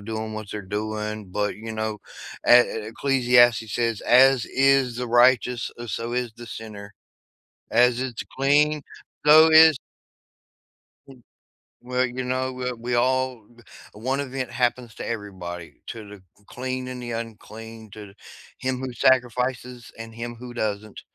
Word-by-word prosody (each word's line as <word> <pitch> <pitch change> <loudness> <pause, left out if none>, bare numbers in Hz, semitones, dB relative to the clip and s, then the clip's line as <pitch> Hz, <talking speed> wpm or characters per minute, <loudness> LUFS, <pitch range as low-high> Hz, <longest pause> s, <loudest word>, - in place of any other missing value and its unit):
doing 110 +1 -5
what 110 -2 -7
they're 105 - -5 0.2
doing, 105 -2 -5
but, 105 +2 -1
you 110 +1 -8
know, 110 -1 -3 0.5
a 120 - +9
a 110 -3 -3
Ecclesiastes 120 -3 +3
says, 115 -3 -1
"As 130 -1 +5
is 135 -2 +2
the 125 0 -3
righteous, 120 0 +3
uh, 120 - -7
so 115 +2 -4
is 125 -2 -2
the 120 0 -11
sinner. 105 -3 -9 0.8
As 125 0 +4
it's 125 -5 -4
clean, 145 +2 +2 0.4
so 155 +2 +8
is" 160 -1 +8 1.3
M 130 -3 -15 0.6
Well, 125 +1 0
you 130 +1 -5
know, 130 +1 -2
we 125 0 -3
we 120 +1 -3
all 130 -2 0
b 120 +1 -21 0.3
one 130 +6 -2
event 135 -2 -4
happens 120 -1 -1
to - - -7
everybody, 95 -6 -7
to 110 -2 -8
the 105 - -11
c 95 +2 -28
clean 130 0 -5
and 125 -1 -7
the 120 -1 -6
unclean, 115 -1 -8
to 105 -1 -11 0.4
him 130 -1 -2
who 130 -1 -5
sacrifices 125 0 0
and 115 0 -9
him 120 +1 -6
who 120 +1 -10
doesn't, 105 -2 -4
120 Hz, 150 wpm, -24 LUFS, 110-130 Hz, 1.3 s, a